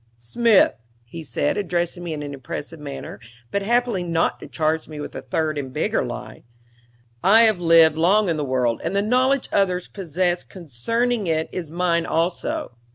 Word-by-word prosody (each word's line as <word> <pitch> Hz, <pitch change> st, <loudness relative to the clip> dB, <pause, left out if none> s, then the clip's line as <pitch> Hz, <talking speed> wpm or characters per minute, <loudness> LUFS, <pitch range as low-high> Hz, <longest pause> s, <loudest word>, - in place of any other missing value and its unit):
"Smith," 210 Hz, -, +3 dB, 0.3 s
he 160 Hz, +8 st, -9 dB
said, 145 Hz, +2 st, -1 dB
addressing 175 Hz, -2 st, -2 dB
me 170 Hz, -, -4 dB
in 150 Hz, -1 st, -4 dB
an 145 Hz, -1 st, -6 dB
impressive 145 Hz, +4 st, -7 dB
manner, 140 Hz, -2 st, -7 dB, 0.3 s
but 200 Hz, -, 0 dB
happily 235 Hz, -1 st, +1 dB
not 170 Hz, -2 st, 0 dB
to -, -, -10 dB
charge 155 Hz, 0 st, -1 dB
me 155 Hz, -1 st, -8 dB
with 145 Hz, -, -6 dB
a -, -, -6 dB
third 155 Hz, -2 st, -1 dB
and 130 Hz, -2 st, -6 dB
bigger -, -, 0 dB
lie, -, -, -7 dB, 0.8 s
"I 215 Hz, +5 st, +7 dB
have 215 Hz, -5 st, +3 dB
lived 165 Hz, -2 st, +5 dB
long 195 Hz, +6 st, +3 dB
in 165 Hz, -, +1 dB
the 150 Hz, -, -2 dB
world, 125 Hz, -4 st, 0 dB
and 170 Hz, +4 st, -2 dB
the 200 Hz, -, +2 dB
knowledge 255 Hz, +4 st, +2 dB
others 185 Hz, -2 st, +1 dB
possess 180 Hz, -1 st, -1 dB
concerning 205 Hz, -, -2 dB
it 160 Hz, -1 st, 0 dB
is 170 Hz, -4 st, -5 dB
mine 170 Hz, 0 st, 0 dB
also. 165 Hz, -6 st, -1 dB
170 Hz, 175 wpm, -22 LUFS, 155-200 Hz, 0.8 s, I